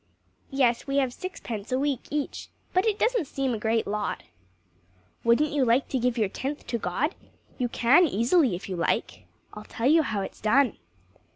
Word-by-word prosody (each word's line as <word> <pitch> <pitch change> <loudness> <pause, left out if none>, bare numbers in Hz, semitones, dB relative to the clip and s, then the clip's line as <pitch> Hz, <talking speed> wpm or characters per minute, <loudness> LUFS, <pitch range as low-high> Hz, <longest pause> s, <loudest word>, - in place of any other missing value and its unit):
"Yes, 260 -3 +1
we 275 0 0
have 260 -3 +1
sixpence 235 - -6
a 255 - +2
week 280 -2 -1
each, 295 -1 -3 0.2
but 370 +4 +2
it 420 -2 +1
doesn't 455 - +1
seem 270 -2 -1
a 220 - -3
great 220 +1 +1
lot." 210 +1 -3 1.0
"Wouldn't 240 +6 +3
you 285 -2 +2
like 245 +2 +2
to 260 - 0
give 245 0 0
your 215 -3 +2
tenth 275 +9 -5
to 235 - -2
God? 230 - -1 0.5
You 245 -1 0
can 260 +10 +5
easily, 250 - +2
if 175 - -8
you 190 - -4
like. 170 - -1 0.3
I'll 210 - -8
tell 230 - -5
you 315 +5 +6
how 215 -9 -2
it's - - -9
done." 255 +6 +3
255 Hz, 185 wpm, -26 LUFS, 225-290 Hz, 1.0 s, you